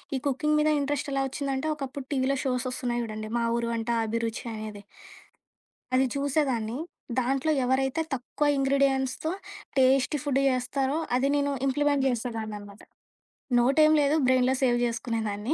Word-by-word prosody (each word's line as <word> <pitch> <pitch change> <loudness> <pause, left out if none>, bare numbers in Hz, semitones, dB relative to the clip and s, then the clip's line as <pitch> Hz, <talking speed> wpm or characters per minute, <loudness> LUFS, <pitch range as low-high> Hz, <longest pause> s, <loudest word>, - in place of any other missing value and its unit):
ఈ - - 0
కుకింగ్ 300 +3 +1
మీద 310 - +3
ఇంట్రెస్ట్ 285 0 -2
ఎలా 270 0 +1
ఒచ్చిందంటే 275 +2 -2
ఒకప్పుడు 275 -2 -6
టీవీలో 270 0 +1
షోస్ 255 -1 0
ఒస్తున్నాయి 245 -2 -2
జూడండి. 215 -1 -5
మా 235 - +1
ఊరు 235 0 -1
అంట 225 +1 -4 0.2
అభిరుచి 230 +2 -3
అనేది... 215 -1 -7 1.1
అది 265 +1 +4
చూసేదాన్ని. 265 -5 0 0.4
దాంట్లో 270 +4 +1
ఎవరైతే 265 +4 +1
తక్కువ 270 +3 -2
ఇంగ్రీడియెంట్స్‌తో 270 +1 +1 0.5
టేస్టి 265 +2 +4
ఫుడ్ 280 -2 0
జేస్తారో 265 +3 0 0.2
అది 255 +2 +2
నేను 285 0 +1
ఇంప్లిమెంట్ 285 +1 +2
చేసేదాన్నినమాట. 220 -4 -4 0.8
నోట్ 265 +5 +3
ఏమి 310 - +5
లేదు. 285 +1 +3
బ్రెయిన్‌లో 255 0 +3
సేవ్ 240 -2 +3
జేసుకునేదాన్ని. 225 0 -2
260 Hz, 135 wpm, -27 LUFS, 235-275 Hz, 1.1 s, ఏమి